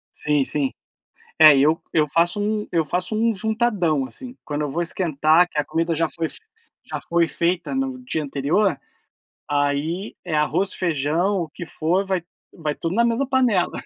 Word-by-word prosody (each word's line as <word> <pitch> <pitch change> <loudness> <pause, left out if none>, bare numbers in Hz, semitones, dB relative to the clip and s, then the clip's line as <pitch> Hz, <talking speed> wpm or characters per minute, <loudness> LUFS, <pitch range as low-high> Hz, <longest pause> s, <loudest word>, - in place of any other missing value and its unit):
Sim, 150 -2 +1
sim. 140 0 -1 0.7
É, 155 -2 +9
eu 150 +4 +3
eu 155 -2 +3
faço 170 +7 +1
um 210 0 -1
eu 165 -2 +2
faço 180 +7 -2
um 225 +1 +2
juntadão, 205 - 0
assim. 255 - -10
Quando 145 0 -3
eu 145 - -2
vou 170 +5 -1
esquentar, 165 -1 +2
que 155 - -6
a 150 - +2
comida 165 +2 -1
já 165 +1 +1
foi 165 0 -3
f - - -6 0.5
já - - -5
foi 170 -1 +2
feita 170 +6 -1
no 265 -1 -2
dia 160 -11 -2
anterior, 145 +9 +1 0.7
aí, 145 +7 -1
é 170 - -4
arroz, 160 +6 +1
feijão, 170 +4 0
o 165 - -4
que 170 +3 -8
for, 170 +5 0
vai 190 -3 -1 0.3
vai 155 -3 -4
tudo 170 +3 -3
na 235 - +4
mesma 235 +4 0
panela. 250 -9 +2
170 Hz, 180 wpm, -22 LUFS, 150-200 Hz, 0.7 s, É